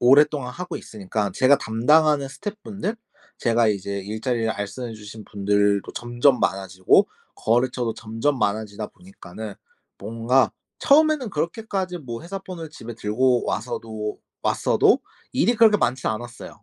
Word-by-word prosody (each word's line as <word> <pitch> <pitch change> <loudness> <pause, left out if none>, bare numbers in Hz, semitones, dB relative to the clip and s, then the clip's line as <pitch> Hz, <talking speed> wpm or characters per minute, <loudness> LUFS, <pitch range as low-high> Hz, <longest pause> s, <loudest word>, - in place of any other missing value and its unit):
오랫동안 140 0 +4
하고 180 +4 -5
있으니까 105 -1 -3
제가 135 +2 +5
담당하는 145 +5 +3
스텝분들 205 +5 -5 0.4
제가 115 -2 +3
이제 100 -1 -2
일자리를 110 +3 -2
알선해 110 +3 -5
주신 105 0 -10
분들도 100 0 +1
점점 120 +2 +2
많아지고 95 -1 +2 0.3
거래처도 120 0 +1
점점 115 +6 -1
많아지다 105 0 -1
보니까는 110 - -10 0.4
뭔가 115 +2 +1 0.3
처음에는 300 -5 +4
그렇게까지 185 +2 -2
뭐 120 -4 -7
회사 190 +4 -5
폰을 180 -4 -8
집에 120 -6 -9
들고 120 +4 +1
와서도 110 -2 -3 0.2
왔어도 - - +3 0.3
일이 240 - +3
그렇게 220 -2 +6
많진 130 -8 0
않았어요. 120 +2 -7
120 Hz, 335 characters per minute, -23 LUFS, 110-155 Hz, 0.4 s, 그렇게